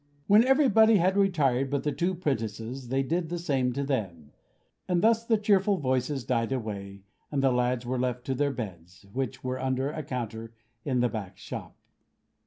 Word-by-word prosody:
When 210 Hz, +3 st, +6 dB
everybody 245 Hz, -5 st, +5 dB
had 190 Hz, 0 st, +3 dB
retired 145 Hz, -10 st, +2 dB
but 140 Hz, 0 st, -1 dB
the 150 Hz, -, 0 dB
two 175 Hz, +6 st, -1 dB
'prentices 125 Hz, -, -3 dB
they 135 Hz, +2 st, 0 dB
did 165 Hz, +4 st, -1 dB
the 175 Hz, -, -2 dB
same 135 Hz, -7 st, 0 dB
to 140 Hz, -, -2 dB
them; 95 Hz, -, -3 dB, 0.6 s
and 180 Hz, -2 st, +1 dB
thus 225 Hz, 0 st, +4 dB
the 230 Hz, -1 st, +2 dB
cheerful 205 Hz, -1 st, +3 dB
voices 130 Hz, -1 st, -1 dB
died 115 Hz, -1 st, 0 dB
away, 100 Hz, -6 st, -5 dB, 0.3 s
and 140 Hz, -2 st, 0 dB
the 135 Hz, -, +4 dB
lads 125 Hz, 0 st, 0 dB
were 125 Hz, +1 st, -2 dB
left 125 Hz, -1 st, -2 dB
to 135 Hz, -, -1 dB
their 145 Hz, +2 st, +1 dB
beds; 90 Hz, -9 st, -7 dB
which 130 Hz, 0 st, -3 dB
were 130 Hz, 0 st, -3 dB
under 130 Hz, +1 st, 0 dB
a 155 Hz, -, -4 dB
counter 115 Hz, -4 st, -5 dB, 0.3 s
in 130 Hz, -3 st, 0 dB
the 125 Hz, -, +2 dB
back 100 Hz, -5 st, -6 dB
shop. -, -, -8 dB
130 Hz, 185 wpm, -28 LUFS, 120-170 Hz, 0.6 s, When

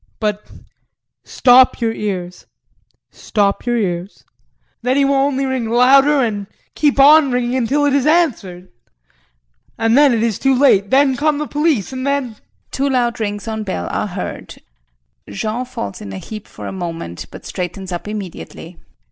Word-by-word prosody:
But 210 Hz, -1 st, -3 dB, 0.7 s
stop 255 Hz, 0 st, +4 dB
your 230 Hz, -2 st, 0 dB
ears, 185 Hz, -5 st, -5 dB, 0.6 s
stop 205 Hz, +2 st, -1 dB
your 240 Hz, 0 st, +1 dB
ears. 180 Hz, -2 st, -3 dB, 0.6 s
Then 255 Hz, +3 st, 0 dB
he 280 Hz, -, +3 dB
will 280 Hz, -, +2 dB
only 275 Hz, 0 st, +1 dB
ring 260 Hz, -4 st, -2 dB
louder 270 Hz, +4 st, +5 dB
and 205 Hz, -4 st, -3 dB, 0.3 s
keep 290 Hz, -2 st, +1 dB
on 290 Hz, 0 st, +7 dB
ringing 245 Hz, 0 st, -1 dB
until 265 Hz, +4 st, +1 dB
it's 280 Hz, 0 st, +2 dB
answered 220 Hz, -, 0 dB, 1.1 s
and 225 Hz, +1 st, +2 dB
then 285 Hz, 0 st, +6 dB
it 230 Hz, -2 st, +1 dB
is 230 Hz, -4 st, -1 dB
too 270 Hz, -1 st, +2 dB
late! 200 Hz, -8 st, +4 dB
Then 270 Hz, 0 st, +3 dB
come 300 Hz, +2 st, +1 dB
the 300 Hz, -, -3 dB
police 295 Hz, -, -1 dB
and 260 Hz, +1 st, -4 dB
then 275 Hz, -6 st, -2 dB, 0.3 s
[Two 275 Hz, +1 st, -1 dB
loud 245 Hz, -3 st, 0 dB
rings 205 Hz, -1 st, -4 dB
on 220 Hz, -1 st, -3 dB
bell 190 Hz, -, -4 dB
are -, -, -2 dB
heard, -, -, -7 dB, 0.7 s
Jean 220 Hz, -, -3 dB
falls 105 Hz, -, -7 dB
in 100 Hz, -, -8 dB
a -, -, -6 dB
heap 215 Hz, -, -9 dB
for -, -, -10 dB
a -, -, -5 dB
moment, 165 Hz, -, -6 dB
but -, -, -12 dB
straightens 185 Hz, +1 st, -5 dB
up 175 Hz, +3 st, -5 dB
immediately. 185 Hz, -4 st, -8 dB
240 Hz, 160 wpm, -18 LUFS, 200-275 Hz, 1.1 s, on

